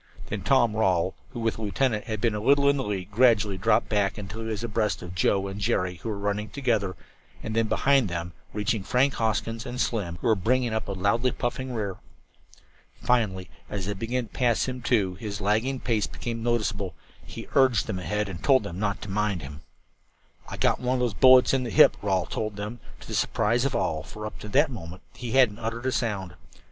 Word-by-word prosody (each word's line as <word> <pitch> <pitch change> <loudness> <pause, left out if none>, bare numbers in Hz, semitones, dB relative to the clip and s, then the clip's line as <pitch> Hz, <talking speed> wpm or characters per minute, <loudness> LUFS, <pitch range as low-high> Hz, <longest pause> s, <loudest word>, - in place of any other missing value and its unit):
Then - - -3
Tom 120 -5 +3
Rawle, 95 -6 +2 0.2
who, - - -7
with 115 -1 -1
the - - -7
lieutenant, 110 +1 0
had 110 -1 -3
been 115 0 +1
a 105 - -2
little 140 +5 +4
in 140 0 +4
the 135 - -1
lead, 100 -3 -4
gradually 105 -4 +3
dropped 105 +2 +2
back 100 -2 0
until 105 +2 -6
he 110 - -5
was 110 0 -3
abreast 105 -6 -1
of 90 0 -7
Joe 95 +2 +1
and 100 +1 -6
Jerry, 90 -2 0
who 115 - -6
were 105 - -3
running 105 +1 -2
together, 110 -8 0 0.5
and 110 - -4
then 115 -1 +2
behind 135 -2 +3
them, 85 0 -4 0.2
reaching 105 0 -1
Frank 125 +7 +2
Hoskins 115 0 -1
and 125 -1 -6
Slim, 100 -10 -1
who - - -8
were 115 - +5
bringing 120 +4 +1
up 110 - -2
a 100 - -2
loudly 100 +6 +1
puffing 130 +1 -3
rear. 100 -4 -3 1.0
Finally, 105 -7 +1 0.2
as 100 -3 -3
they 100 - -2
began 115 +5 -2
to - - -29
pass 120 -3 +2
him, 130 -1 -4
too, 110 -6 +2
and 90 +1 -10
his 105 -2 -5
lagging 110 +7 0
pace 115 -5 0
became 115 -1 -5
noticeable, 105 -6 -1 0.3
he - - -9
urged 130 -6 +4
them 95 - -3
ahead 105 +3 -2
and 95 -2 -7
told 135 -2 +4
them 85 +2 -6
not 100 -1 -1
to 100 - -6
mind 100 -5 0
him. 70 +2 -9 0.9
"I - - -6
got - - +2
one 125 +1 0
of - - -1
those 120 -4 0
bullets 130 +4 +6
in 135 - +2
the 125 - -3
hip," 100 - +6
Rawle 95 -3 +1
told 110 -1 -3
them, 105 +4 -6 0.2
to - - -12
the - - -6
surprise 120 +4 +1
of 140 - -1
all, 80 -1 0
for 105 0 -8
up 110 - -7
to - - -8
that 140 +7 +3
moment 90 -5 -8
he 125 -2 -6
hadn't 125 -5 +4
uttered 115 +2 -4
a 130 - +1
sound. 100 -8 -2
110 Hz, 220 wpm, -26 LUFS, 100-120 Hz, 1.0 s, bullets